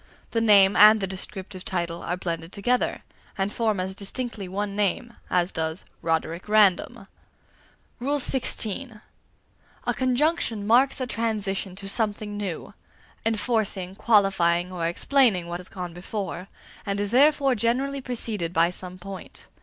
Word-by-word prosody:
The 230 Hz, -, +1 dB
name 200 Hz, -3 st, +6 dB
and 215 Hz, +1 st, +8 dB
the 195 Hz, -, -1 dB
descriptive 190 Hz, 0 st, -6 dB
title 170 Hz, -2 st, -3 dB
are 180 Hz, -, -3 dB
blended 165 Hz, -2 st, -4 dB
together, 245 Hz, +5 st, 0 dB, 0.3 s
and 195 Hz, +1 st, -1 dB
form 220 Hz, -4 st, 0 dB
as 185 Hz, +1 st, -2 dB
distinctly 205 Hz, +1 st, -6 dB
one 200 Hz, +2 st, -3 dB
name 210 Hz, +3 st, -1 dB, 0.2 s
as 180 Hz, 0 st, +1 dB
does 160 Hz, +2 st, -3 dB, 0.2 s
"Roderick 165 Hz, +3 st, -2 dB
Random." 210 Hz, -4 st, +3 dB, 1.0 s
XVI. 255 Hz, -4 st, -1 dB, 0.8 s
A -, -, +1 dB
conjunction 255 Hz, -4 st, +1 dB
marks 250 Hz, +6 st, +4 dB
a -, -, 0 dB
transition 210 Hz, -5 st, -1 dB
to 195 Hz, +1 st, -7 dB
something 210 Hz, 0 st, -1 dB
new 200 Hz, -5 st, -5 dB, 0.5 s
enforcing, 215 Hz, -5 st, -1 dB
qualifying, 190 Hz, -5 st, +2 dB
or 170 Hz, -2 st, -2 dB
explaining, 210 Hz, 0 st, +2 dB
what 170 Hz, +1 st, -5 dB
has 180 Hz, -, -5 dB
gone 180 Hz, -2 st, -6 dB
before, 185 Hz, 0 st, -5 dB, 0.4 s
and 200 Hz, -1 st, -2 dB
is 205 Hz, 0 st, -2 dB
therefore 280 Hz, +1 st, +4 dB
generally 255 Hz, +5 st, 0 dB
preceded 225 Hz, -9 st, -2 dB
by 170 Hz, 0 st, +3 dB
some 180 Hz, 0 st, -9 dB
point. 190 Hz, +1 st, -10 dB
200 Hz, 135 wpm, -25 LUFS, 180-230 Hz, 1.0 s, and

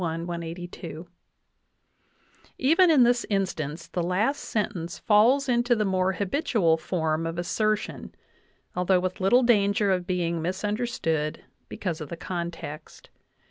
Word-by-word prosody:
^Even 170 Hz, 0 st, -5 dB, 1.8 s
in 295 Hz, -6 st, +6 dB
this 240 Hz, 0 st, +3 dB
in 195 Hz, -2 st, +1 dB
stance 155 Hz, -2 st, -5 dB
the 175 Hz, +1 st, -3 dB
last 200 Hz, +11 st, 0 dB
sentence 195 Hz, -6 st, -3 dB
falls 240 Hz, +7 st, +4 dB
into 240 Hz, 0 st, +2 dB
the 215 Hz, -2 st, 0 dB
more 190 Hz, 0 st, +1 dB
'habitual 200 Hz, -, +1 dB
form 160 Hz, -1 st, -1 dB
of 165 Hz, +1 st, -5 dB
assertion, 215 Hz, +4 st, -2 dB, 0.6 s
although 180 Hz, +1 st, +3 dB
with 185 Hz, +1 st, -3 dB
little 245 Hz, +7 st, +4 dB
danger 205 Hz, -3 st, +3 dB
of 180 Hz, -1 st, -1 dB
being 170 Hz, -2 st, -1 dB
misunderstood 185 Hz, -4 st, -2 dB, 0.3 s
because 170 Hz, -5 st, -4 dB
of 150 Hz, -, -6 dB
the 170 Hz, -, -6 dB
context. 170 Hz, -3 st, -7 dB
185 Hz, 120 wpm, -26 LUFS, 165-215 Hz, 1.8 s, in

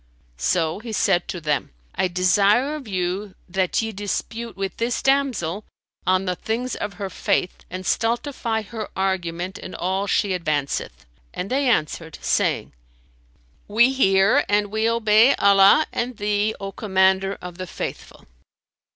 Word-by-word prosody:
So 160 Hz, -, 0 dB
he 225 Hz, 0 st, -7 dB
said 185 Hz, -3 st, +2 dB
to 180 Hz, -, -4 dB
them, 150 Hz, -3 st, -1 dB, 0.2 s
"I 190 Hz, -, +1 dB
desire 200 Hz, -, +3 dB
of 295 Hz, -5 st, -7 dB
you 185 Hz, +1 st, -3 dB
that 185 Hz, +3 st, 0 dB
ye 225 Hz, -, -3 dB
dispute 220 Hz, +3 st, -4 dB
with 195 Hz, -1 st, -4 dB
this 235 Hz, +1 st, -1 dB
damsel 250 Hz, -10 st, 0 dB, 0.4 s
on 185 Hz, +1 st, +3 dB
the 180 Hz, -1 st, -1 dB
things 235 Hz, +6 st, -3 dB
of 205 Hz, -1 st, -4 dB
her 200 Hz, +1 st, -5 dB
faith, 180 Hz, -, 0 dB
and 185 Hz, +1 st, -6 dB
stultify 230 Hz, 0 st, -1 dB
her 215 Hz, 0 st, -6 dB
argument 185 Hz, -1 st, -2 dB
in -, -, -8 dB
all 190 Hz, +3 st, -1 dB
she 200 Hz, -, +1 dB
advanceth;" 155 Hz, -6 st, -2 dB, 0.3 s
and 195 Hz, -, -4 dB
they 270 Hz, 0 st, +2 dB
answered, 160 Hz, -5 st, -1 dB
saying, -, -, 0 dB, 0.9 s
"We 235 Hz, +5 st, +4 dB
hear 195 Hz, -5 st, +4 dB
and 205 Hz, 0 st, +1 dB
we 220 Hz, +1 st, +1 dB
obey 230 Hz, +2 st, +5 dB
Allah 200 Hz, +8 st, +6 dB
and 240 Hz, -1 st, -2 dB
thee, 205 Hz, +1 st, 0 dB
O 195 Hz, 0 st, -5 dB
Commander 190 Hz, -1 st, +1 dB
of 180 Hz, 0 st, -9 dB
the 185 Hz, -, -5 dB
Faithful." -, -, -7 dB
200 Hz, 145 wpm, -23 LUFS, 185-225 Hz, 0.9 s, Allah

